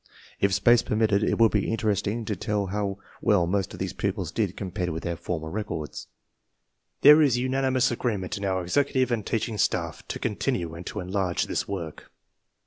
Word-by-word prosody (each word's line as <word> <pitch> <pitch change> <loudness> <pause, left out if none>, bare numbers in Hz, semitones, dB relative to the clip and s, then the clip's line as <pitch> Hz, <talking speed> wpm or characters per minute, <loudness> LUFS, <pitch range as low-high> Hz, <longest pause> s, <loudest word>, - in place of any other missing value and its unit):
If 100 - +3
space 120 +5 +5
permitted, 105 -2 +1
it - - +1
would 115 -1 +5
be 105 0 0
interesting 110 +1 -1
to 105 - -2
tell 105 +2 -1
how 100 0 -2 0.2
well 100 -5 +3
most 95 +2 -1
of - - -9
these 95 -1 -3
pupils 95 -4 -2
did 105 -5 -1
compared 90 -2 -3
with 80 0 -4
their 85 0 -2
former 85 -1 -4
records. 80 - -5 0.9
There 150 +2 +9
is 135 -5 +4
unanimous 130 0 +1
agreement 105 -6 -2
in 100 - -6
our 95 -2 0
executive 130 +5 +1
and 115 -3 0
teaching 110 0 -2
staff - - 0
to - - -4
continue 85 -2 -2
and 85 +2 -8
to - - -4
enlarge 90 -1 -1
this - - -2
work. 85 -6 -6
100 Hz, 180 wpm, -26 LUFS, 90-115 Hz, 0.9 s, There